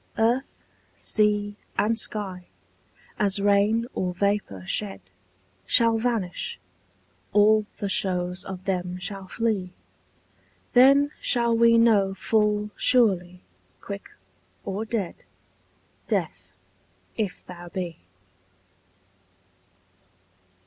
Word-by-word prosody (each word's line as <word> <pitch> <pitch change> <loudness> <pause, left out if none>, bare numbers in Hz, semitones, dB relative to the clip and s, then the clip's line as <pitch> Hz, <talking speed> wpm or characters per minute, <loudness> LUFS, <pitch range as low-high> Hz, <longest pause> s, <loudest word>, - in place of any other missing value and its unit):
Earth, 240 +4 0 0.4
sea, 210 -1 +1 0.2
and 225 +2 +2
sky, 195 -5 0 0.7
as 200 -1 +2
rain 205 +3 +2
or 180 -1 -2
vapour 200 - -1
shed, 95 0 -1 0.7
Shall 230 -1 +4
vanish; 230 - -2 0.7
all 210 0 +4
the 200 - -3
shows 180 -1 -1
of 190 -1 -8
them 180 -2 -2
shall 195 +1 -6
flee: 200 -5 -2 1.0
Then 275 +3 +6
shall 235 -2 +2
we 230 0 +5
know 205 -4 +3
full 210 +1 0
surely, 185 -7 +2 0.4
quick 200 0 -8 0.6
or 200 +3 -3
dead, 215 -6 -3 0.9
Death, - - -3 0.6
if 210 -5 -4
thou 175 -1 -10
be. 175 -3 -5
205 Hz, 90 wpm, -25 LUFS, 185-225 Hz, 1.0 s, Then